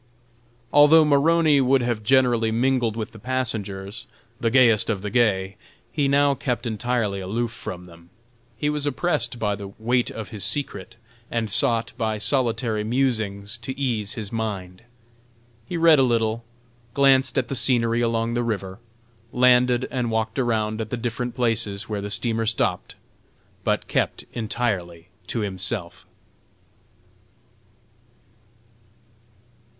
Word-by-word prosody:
Although 150 +2 +7
Maroney 150 0 +4
would 130 0 +3
have 120 -3 -1
generally 120 -1 +3
mingled 120 -1 +1
with 110 -1 -4
the 110 - -13
passengers, 110 -5 -3 0.3
"the 115 - +1
gayest 115 -3 +4
of 100 -4 -2
the 105 - -4
gay," 100 -5 +1 0.3
he 145 -3 0
now 140 +1 +3
kept 125 -2 -3
entirely 115 -3 -1
aloof 110 +5 -2
from 90 -6 -7
them. 85 -1 -16 0.5
He 145 - -1
was 150 -1 -1
oppressed 130 -5 -1
by 105 -3 0
the 100 0 -8
"weight 120 +2 +1
of 110 -2 -7
his 105 -5 -6
secret," 115 -2 -4 0.3
and 115 -3 -2
sought 115 +3 +2
"by 110 -2 -1
solitary 115 -2 0
musings" 110 -3 -1
to 130 +3 -6
ease 115 -7 -1
his 105 -3 -6
mind. 100 -5 -4 0.9
He 175 - -3
read 165 -3 +6
a - - +6
little, 115 -2 +1 0.5
glanced 135 -2 +4
at 130 - +1
the - - -4
scenery 120 -2 +2
along 115 0 0
the 120 - 0
river, 100 -4 -3 0.5
landed 125 0 +4
and 125 -3 -1
walked 110 +3 -1
around 110 -3 0
at 110 - -5
the 125 - -3
different 120 +1 -3
places 115 -5 -1
where 105 -2 -3
the 100 - -5
steamer 115 +1 -1
stopped, 115 - -1 0.7
but - - 0
kept - - -1
entirely 95 -7 -3 0.2
to 115 - -2
himself. 95 -2 -4
115 Hz, 135 wpm, -23 LUFS, 105-125 Hz, 0.9 s, Although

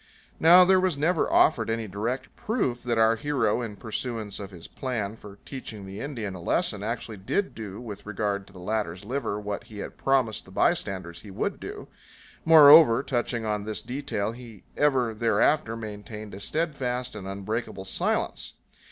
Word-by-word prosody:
Now 175 +3 +8
there 190 0 +5
was 185 -5 +1
never 160 +3 +1
offered 115 -8 +4
any 115 -1 -1
direct 110 +7 -4
proof 135 - -1
that 120 -2 -1
our 110 0 +5
hero, 140 0 0
in 110 -4 -5
pursuance 110 -1 -4
of 100 -2 -6
his 90 -4 -11
plan 115 -6 -3
for 100 -3 -12
teaching 110 -7 -7
the 95 +2 -7
Indian 115 -9 -4
a 90 - -8
lesson, 105 - 0
actually 110 0 -4
did 190 - -1
do 105 -3 -7
with 105 -4 -8
regard 100 -1 -2
to - - -17
the - - -13
latter's 95 -1 -3
liver 120 -3 -2
what 105 -1 -5
he 105 - -12
had 100 - -7
promised 130 -6 +1
the - - -15
bystanders 85 -3 0
he 105 - -12
would 95 - -3
do; - - -8 0.6
moreover, 150 -5 +9
touching 120 -3 -1
on 105 -1 -1
this 110 0 -4
detail 125 -6 -3
he 115 -4 -12
ever 130 -6 +2
thereafter 115 +3 +2
maintained 105 -1 -8
a 95 - -7
steadfast 125 -2 -2
and 95 - -7
unbreakable 100 +1 -4
silence. 95 - -1
115 Hz, 170 wpm, -27 LUFS, 100-130 Hz, 0.6 s, moreover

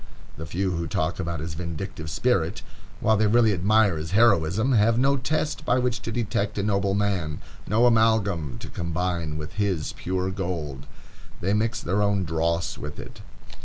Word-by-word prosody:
The 80 +1 -7
few 95 +3 -1
who 85 -1 -2
talk 80 +3 -1
about 85 -2 -3
his 80 0 -5
vindictive 80 -1 -5
spirit, 75 - 0 0.4
while 110 - +4
they 110 +1 +3
really 110 0 +4
admire 100 0 +3
his 80 +3 -5
heroism, 105 +1 +3
have 115 -1 +4
no 135 +3 +3
test 150 +3 -2
by 125 - +2
which 125 -1 0
to 115 - -5
detect 105 -3 -1
a 100 - 0
noble 100 -1 +1
man, 95 -8 -1 0.3
no 110 +4 +3
amalgam 105 - +2
to - - -6
combine 85 -2 -2
with 75 +4 -7
his 95 -6 -1
pure 95 +1 -2
gold. 85 -8 -4 0.5
They 95 +3 0
mix 110 +3 0
their 95 +5 0
own 100 -2 +2
dross 85 0 -1
with 75 0 -7
it. - - -10
95 Hz, 170 wpm, -25 LUFS, 80-110 Hz, 0.5 s, while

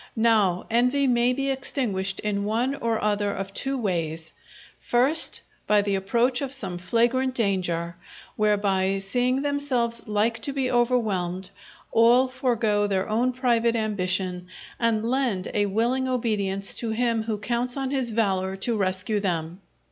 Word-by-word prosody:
Now, 215 -6 +2
envy 250 +4 +3
may 245 -1 +3
be 275 +2 -1
extinguished 205 -8 -2
in 205 -1 -1
one 230 +6 0
or 230 -5 -1
other 205 -1 0
of 195 0 -5
two 270 +4 -2
ways: 165 -7 -2 0.5
first, 265 +7 +2 0.3
by 210 -1 +4
the 200 -1 -1
approach 235 +7 +1
of 275 0 -2
some 180 -10 -4
flagrant 240 +7 +1
danger, 175 -6 -1 0.4
whereby 200 -2 +1
seeing 245 +7 0
themselves 260 -5 -1
like 215 +2 +1
to 280 - -4
be 265 -2 -1
overwhelmed, 200 -7 0 0.4
all 240 +3 +5
forego 230 -5 0
their 195 -1 -1
own 235 +4 +1
private 235 -2 +1
ambition 185 -4 -1 0.3
and 225 -2 +1
lend 240 -7 -1
a 205 -1 +1
willing 240 +6 0
obedience 205 -6 -1
to 230 - -2
him 230 0 0
who 220 -1 -2
counts 240 +4 -2
on 270 -1 -2
his 265 -4 -1
valour 190 -4 0
to 225 +5 -2
rescue 190 +1 -1
them. 175 -2 -3
220 Hz, 145 wpm, -25 LUFS, 195-250 Hz, 0.5 s, all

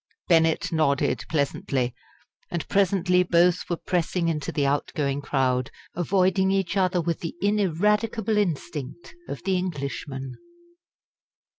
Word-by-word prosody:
Bennett 165 -2 +3
nodded 140 -7 +1
pleasantly, 140 -4 -1 0.6
and 170 -2 -3
presently 185 -2 +3
both 175 0 +3
were 175 - 0
pressing 175 -1 0
into 150 -3 -2
the 145 - 0
out 140 +1 0
going 140 -3 0
crowd, 130 -3 0 0.2
avoiding 190 +2 +2
each 195 -1 0
other 185 -2 +2
with 170 -1 -1
the 165 - -5
ineradicable 210 +3 +1
instinct 160 -4 -3 0.2
of 140 - -6
the 190 0 +1
Englishman. 140 -6 -4
170 Hz, 120 wpm, -25 LUFS, 145-185 Hz, 0.6 s, Bennett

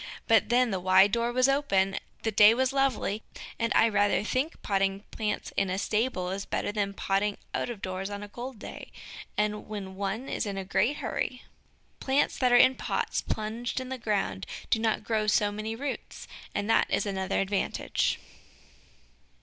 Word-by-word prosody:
But 225 -1 +4
then 245 -1 +3
the 190 - -1
wide 190 +2 +5
door 235 +2 +1
was 255 +1 +3
open, 200 -9 +2 0.2
the 220 - 0
day 210 +2 +7
was 260 +1 +1
lovely, 260 -6 +1 0.4
and 230 0 0
I 225 - +6
rather 205 -1 +2
think 260 +9 -1
potting 195 -1 0
plants 215 -2 -3
in 195 - +1
a 185 - -1
stable 210 -3 0
is 195 +1 -3
better - - -2
than 205 -1 -1
potting 200 +2 0 0.2
out - - -1
of 225 -5 -7
doors 185 +1 -3
on 205 0 -5
a - - -7
cold 245 +4 -7
day, - - -9 0.5
and 210 0 -1
when 200 -3 -6
one 200 +6 -3
is - - -2
in 200 -1 -3
a 195 - -4
great 200 +9 +1
hurry. 250 - -3 0.6
Plants 275 +2 +1
that 250 -2 +3
are 245 - +7
in 260 - +7
pots - - -1
plunged 225 +3 -3
in 255 0 -6
the 260 -1 -4
ground 200 - -1 0.2
do 225 - +4
not 220 -1 0
grow 215 -2 0
so 210 -1 +3
many 215 +2 -4
roots, 275 +3 -6 0.3
and 200 - -1
that 225 - +3
is - - +1
another 190 -2 -1
advantage. 195 0 0
210 Hz, 180 wpm, -28 LUFS, 195-240 Hz, 0.6 s, day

